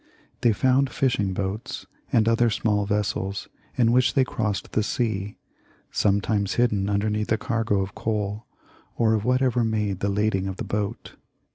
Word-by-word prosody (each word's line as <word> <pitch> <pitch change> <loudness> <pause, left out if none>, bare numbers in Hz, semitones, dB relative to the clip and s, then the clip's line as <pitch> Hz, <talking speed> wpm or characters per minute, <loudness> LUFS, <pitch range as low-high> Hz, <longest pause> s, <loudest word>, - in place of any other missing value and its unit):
They 120 - +4
found 130 +5 +2
fishing 115 -9 0
boats 95 +3 -4 0.3
and 110 -1 +3
other 115 +1 +4
small 105 -1 0
vessels 100 -1 -2 0.3
in 115 -2 +4
which 125 +3 +3
they 135 - +5
crossed 110 -5 -2
the 110 - +1
sea, 105 -3 -2 0.5
sometimes 100 0 +1
hidden 105 -5 +1
underneath 105 +1 0
the 110 - +2
cargo 110 -4 0
of 95 0 -4
coal, 105 0 -3 0.5
or 110 -1 +3
of 110 -1 0
whatever 125 -1 +2
made 105 -4 -1
the 100 - 0
lading 100 -1 0
of 95 -1 -5
the - - -4
boat. 105 -1 -4
105 Hz, 155 wpm, -25 LUFS, 100-115 Hz, 0.5 s, they